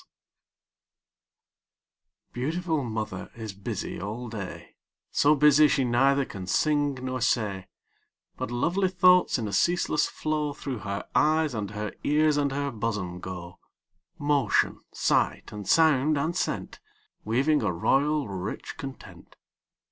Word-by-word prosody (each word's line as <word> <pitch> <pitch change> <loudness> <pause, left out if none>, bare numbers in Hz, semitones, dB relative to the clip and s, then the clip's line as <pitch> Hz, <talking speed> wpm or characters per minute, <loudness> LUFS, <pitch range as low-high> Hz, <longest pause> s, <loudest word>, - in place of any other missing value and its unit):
_ - - -45
Beautiful 160 +4 -1
mother 110 -5 -4
is 110 -3 -6
busy 100 0 -5
all 110 +5 -5
day, 105 -4 -8 0.4
So 150 +2 +4
busy 150 +1 +6
she 145 -2 +1
neither 135 +3 +3
can 95 -6 -8
sing 145 +5 +1
nor 130 0 -4
say; 100 -6 0 0.7
But - - -4
lovely 175 +11 +1
thoughts, 180 -2 +4
in 115 -3 -3
a 100 - -5
ceaseless 170 -3 +2
flow, 150 -1 -2
Through 135 -4 -5
her 100 -1 -5
eyes, 155 -1 +3
and 105 -3 -3
her 105 0 -5
ears, 150 0 +3
and 140 -1 +1
her 140 +1 -2
bosom 105 -6 -3
go 90 -1 -8 0.6
Motion, 145 -2 +1
sight, - - 0
and 105 -2 -7
sound, 155 -2 +4
and 160 +5 -1
scent, - - -3 0.4
Weaving 135 +7 +2
a 105 -3 0
royal, 140 - +1
rich 95 0 -5
content. 135 -1 -10
135 Hz, 130 wpm, -27 LUFS, 105-150 Hz, 0.7 s, busy